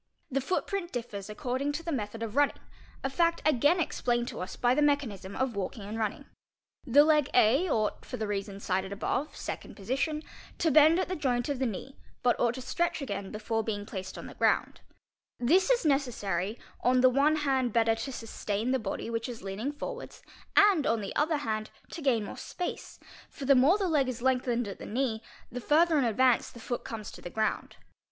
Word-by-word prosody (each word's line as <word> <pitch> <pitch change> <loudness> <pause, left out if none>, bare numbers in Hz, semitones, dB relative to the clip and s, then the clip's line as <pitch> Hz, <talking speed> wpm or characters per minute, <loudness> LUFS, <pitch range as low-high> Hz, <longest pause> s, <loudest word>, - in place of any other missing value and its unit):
'The 275 +1 +1
footprint 365 +4 -2
differs 215 -4 -5
according 260 +5 -2
to 305 +3 -4
the 335 - -3
method 225 -4 -3
of 225 -1 -5
running, 290 0 +3 0.5
a - - +1
fact 335 +5 +1
again 300 +5 +4
"explained 240 -6 0
to - - -6
us 185 - -5
by 245 0 +2
the 295 - +2
mechanism 255 -10 0
of 260 -4 -1
walking 200 +3 -4
and 215 +3 -5
running. 215 -2 -2 0.6
The 280 +4 +7
leg 300 -3 +3
A 270 +12 +4
ought, 215 -6 0
for - - -6
the 220 - -2
reasons 200 -1 -4
cited 190 +1 -1
above 255 +8 -2
(second - - -6
position), 275 +9 -2 0.3
to 325 - +2
bend 310 +3 +7
at - - 0
the 370 - -2
joint 250 -4 0
of 280 -3 -1
the 265 - +1
knee 235 +5 -6 0.3
but 245 -1 +4
ought 240 0 +2
to 260 - -6
stretch 340 +4 -1
again 200 -8 -4
before 220 +1 -2
being 205 -2 -3
placed 190 -3 -6
on - - -7
the - - -9
ground: - - +1 0.6
'This 345 +10 +3
i - - +7
is 475 - -6
necessary, 220 - 0 0.2
on 250 0 +3
the 255 - +7
one 285 +4 +4
hand 265 -5 +1
better 225 0 +3
to 225 +5 -4
sustain 225 -1 -3
the 265 - +2
body 215 -1 -4
which 230 +1 -3
is 235 -5 -8
lean 195 0 -5
'ing 265 +6 -1
forwards 480 +12 -7 0.3
and, 405 -7 +5
on 225 -1 +1
the 200 - -5
other 310 +1 +2
hand, 215 -5 -3 0.2
to 330 - -6
gain 250 -7 +2
more - - -8
space, 360 - -5 0.3
for 275 - -8
the 275 - +6
more 275 +9 +5
the 395 -3 0
leg 295 -6 +2
i - - -1
is 240 -1 -5
lengthened 250 -3 +1
at 200 - -7
the - - -7
knee 225 -1 -1 0.3
the 250 +1 -5
further 315 +3 +4
in 265 - +2
advance 240 +2 +3
the 235 - -13
foot 240 +1 -4
comes 220 -2 -6
to - - -12
the - - -7
ground. 220 +3 -2
250 Hz, 215 wpm, -29 LUFS, 220-290 Hz, 0.6 s, The